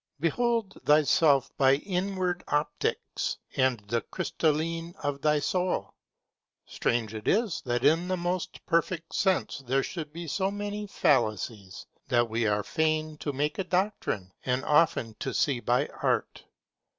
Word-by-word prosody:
Behold 225 - 0
thyself 145 -2 +4
by 135 0 +5
inward 185 +1 -2
opticks 150 +1 -1 0.2
and 130 -4 +2
the 115 +3 -1
crystalline 165 - -1
of 140 -1 -2
thy 150 0 +3
soul. 180 +4 -1 0.7
Strange 115 -2 -1
it 110 -1 -7
is 215 -3 +1
that 120 +1 0
in 165 +4 +4
the 185 0 0
most 175 0 -3
perfect 170 0 0
sense 190 -6 +1
there 135 +2 +2
should 155 -4 -5
be 170 +2 -7
so 190 +5 0
many 205 +1 -4
fallacies, 110 - 0 0.2
that 120 0 +3
we 115 0 +1
are 105 0 +1
fain 155 +1 0
to 145 - -3
make 145 +4 -2
a - - +1
doctrine, 180 - -1
and 125 0 -1
often 150 -7 +3
to - - -3
see 135 -5 +2
by 125 +4 +2 0.2
art. - - -1
155 Hz, 140 wpm, -28 LUFS, 130-180 Hz, 0.7 s, by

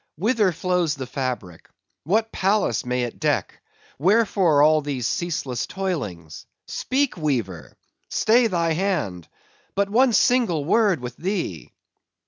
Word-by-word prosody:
—whither 210 - +2
flows 175 -2 0
the 135 -2 -5
fabric? 125 -10 -5 0.4
what 220 +7 +1
palace 195 - +1
may 125 0 0
it 120 - -5
deck? - - -1 0.4
wherefore 185 -4 +3
all 155 0 +5
these 140 -5 -3
ceaseless 140 -6 -2
toilings? 120 - -5 0.2
Speak, 275 -2 -1
weaver!—stay 140 - -1
thy 170 -5 0
hand!—but 180 - -4
one 250 +3 +4
single 225 - +2
word 200 - +2
with 125 0 -6
thee! 175 - -3
165 Hz, 110 wpm, -23 LUFS, 125-200 Hz, 0.4 s, all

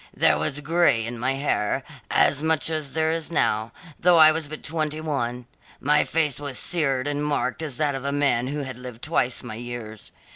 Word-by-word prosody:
There - - +4
was 145 +2 -2
grey 145 -6 +2
in 120 0 -6
my 130 +3 +1
hair, 135 -6 -1 0.3
as 145 0 +3
much 160 0 +2
as 155 -3 -3
there 160 0 +1
is 165 -1 -2
now, 110 -9 0 0.3
though 175 -1 +5
I 155 -1 +8
was 155 -1 -3
but 155 - -7
twenty 155 -1 -2
one; 125 -6 -3 0.3
my 150 +2 +3
face 150 -4 0
was 140 -3 -5
seared 140 -6 0
and 145 0 -1
marked 145 -1 -1
as 145 -6 -4
that 150 -2 +1
of 135 -1 -5
a 140 - -1
man 140 -4 +1
who 145 +2 -3
had 130 -2 -7
lived 125 -2 -9
twice 145 -6 0
my 120 -3 -7
years. 115 -2 -7
145 Hz, 205 wpm, -24 LUFS, 125-155 Hz, 0.3 s, I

